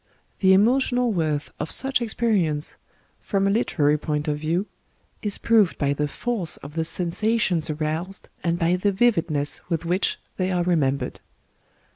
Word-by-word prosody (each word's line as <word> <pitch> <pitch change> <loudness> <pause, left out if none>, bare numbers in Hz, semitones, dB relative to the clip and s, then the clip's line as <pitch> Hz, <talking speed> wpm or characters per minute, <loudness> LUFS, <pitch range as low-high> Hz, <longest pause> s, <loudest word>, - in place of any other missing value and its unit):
The 190 - +3
emo 225 +8 +4
tional 245 -3 0
worth 155 -4 -1
of - - -3
such 270 -1 +3
experience 205 -10 0 0.2
— - - -39
from 195 -1 +1
a 195 - +2
literary 150 -9 +1
point 150 0 -2
of 150 -1 -1
view 165 +6 -1 0.3
— - - -41
is 205 -2 -1
proved 220 -6 +3
by 140 -1 +1
the 150 +1 -1
force 210 -1 -2
of 145 - -9
the 165 0 -1
sen 170 +1 -1
sations 210 -6 +1
aroused, 165 +5 -3 0.2
and 170 0 0
by 175 +1 +1
the 200 +3 +1
vividness 175 -9 +1
with 165 -1 -2
which 180 +3 +1 0.2
they 185 0 0
are 180 -1 +1
remembered. 145 -6 0
175 Hz, 170 wpm, -24 LUFS, 155-210 Hz, 0.3 s, emo